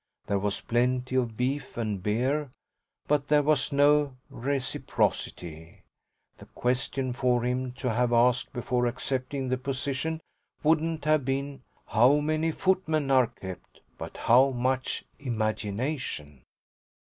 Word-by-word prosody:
There 100 - 0
was 100 0 -1
plenty 125 +2 0
of 120 -4 0
beef 135 +2 -2
and 105 -5 -2
beer, 130 +8 0 0.6
but 145 -1 +1
there 150 0 +4
was 150 -2 +2
no 145 -1 +3
reciprocity. 90 - -2 0.6
The - - -13
question 125 +1 -1
for 125 -1 +1
him 125 +1 -1
to 125 -2 -2
have 120 +1 +1
asked 120 +1 +3
before 125 0 0
accepting 130 +2 -2
the 130 0 0
position 140 +4 -2 0.4
wouldn't 160 0 +1
have 155 -2 +3
been 135 +1 -2 0.2
"How 125 +6 +5
many 155 +2 0
footmen 160 -6 +1
are 130 -2 +5
kept?" 95 -6 -10 0.2
but - - -7
"How 130 +4 +5
much 130 +1 -1 0.2
imagination?" 110 - -3
130 Hz, 125 wpm, -28 LUFS, 120-145 Hz, 0.6 s, How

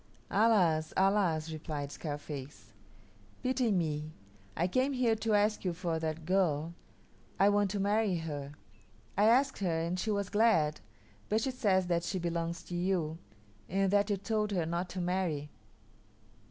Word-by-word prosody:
"Alas, 185 -8 +3
alas!" 185 -5 +2
replied 150 -2 -5
Scarface, 145 -8 -7 0.7
"Pity 255 -2 +1
me. 155 -4 -1 0.5
I 175 - +2
came 255 +8 +1
here 250 -3 +2
to 220 0 +1
ask 210 +1 +2
you 180 -2 0
for 170 -2 -2
that 160 0 -3
girl. 170 -3 +1 0.7
I 195 - +6
want 205 -1 +2
to 200 +1 -2
marry 205 0 +2
her. 145 -4 -5 0.6
I 205 - +4
asked 265 +5 +4
her 170 -5 0
and 170 +2 -2
she 220 - -2
was 200 -2 0
glad, 205 -9 +3 0.5
but 215 +1 +2
she 265 - -1
says 200 -7 +2
that 170 -1 +1
she 185 - -2
belongs 170 -1 -2
to 175 - -7
you, 175 -3 -1 0.5
and 195 +1 +1
that 205 +1 +3
you 205 - +1
told 210 +2 -1
her 175 -4 0
not 170 +2 -2
to 185 - -4
marry." 175 -5 -1
180 Hz, 155 wpm, -32 LUFS, 160-205 Hz, 0.7 s, I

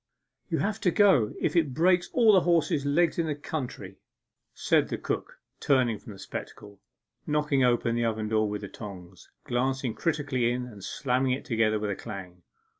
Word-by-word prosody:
'You'll - - 0
have 210 +1 -2
to 180 - +3
go 175 - +4
if - - -1
it 155 -7 +2
breaks 175 +2 +3
all 230 -4 +5
the 190 - +6
horses' 165 -4 +1
legs 170 +4 +2
in 165 - +1
the 150 - -1
county,' 145 -2 -6 0.5
said - - +2
the - - -2
cook, - - -4 0.2
turning 125 -6 +2
from 105 - -11
the - - -12
spectacle, 100 +1 -8 0.5
knocking 150 -3 +1
open 120 -1 +2
the 120 0 0
oven 110 -1 -1
door 110 -1 +1
with 105 0 -4
the 100 - -6
tongs, 95 -4 -11
glancing 130 0 -1
critically 140 -7 0
in, 125 0 -2
and 105 -6 -12
slamming 130 +3 0
it 130 - -5
together 110 -3 +1
with 105 -1 -2
a - - -2
clang. 90 -2 -9
125 Hz, 185 wpm, -27 LUFS, 110-150 Hz, 0.5 s, the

